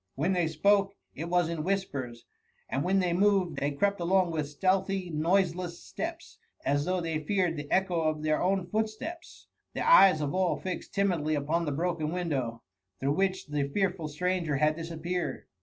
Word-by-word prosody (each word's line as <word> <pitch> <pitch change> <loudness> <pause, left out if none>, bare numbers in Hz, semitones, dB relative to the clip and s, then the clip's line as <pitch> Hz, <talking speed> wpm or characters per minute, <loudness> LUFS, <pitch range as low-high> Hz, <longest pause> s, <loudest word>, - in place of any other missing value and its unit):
When 160 +8 +1
they 175 -3 +1
spoke, 195 +5 +2 0.2
it 165 +4 -5
was 175 -1 +2
in 165 -2 -3
whispers, 140 -11 -3 0.4
and 135 - -1
when 190 +2 +2
they 180 -2 +1
moved, 190 -4 +2
they 140 - 0
crept 200 +8 0
along 180 0 +2
with 155 -3 -2
stealthy 190 +3 0
noiseless 175 +2 0
Steps, - - -6 0.3
as 145 +1 +1
though 185 0 0
they 165 -2 -2
feared 180 -1 +1
the 145 -1 -6
echo 185 -3 +2
of 155 -1 -1
their 155 0 +1
own 190 0 +1
footsteps; 220 - -4 0.3
the - - -1
eyes 195 - +7
of 145 -2 -2
all 185 -1 +1
fixed 185 -1 -6
timidly 175 -6 +1
upon 155 +4 0
the 150 - -1
broken 160 0 -1
window, 135 -10 -2 0.4
through 140 +2 +1
which 190 +2 0
the 145 -1 -2
fearful 180 -1 -1
stranger 170 0 -1
had 150 +2 +2
disappeared. 170 +2 -4
170 Hz, 175 wpm, -29 LUFS, 155-190 Hz, 0.4 s, eyes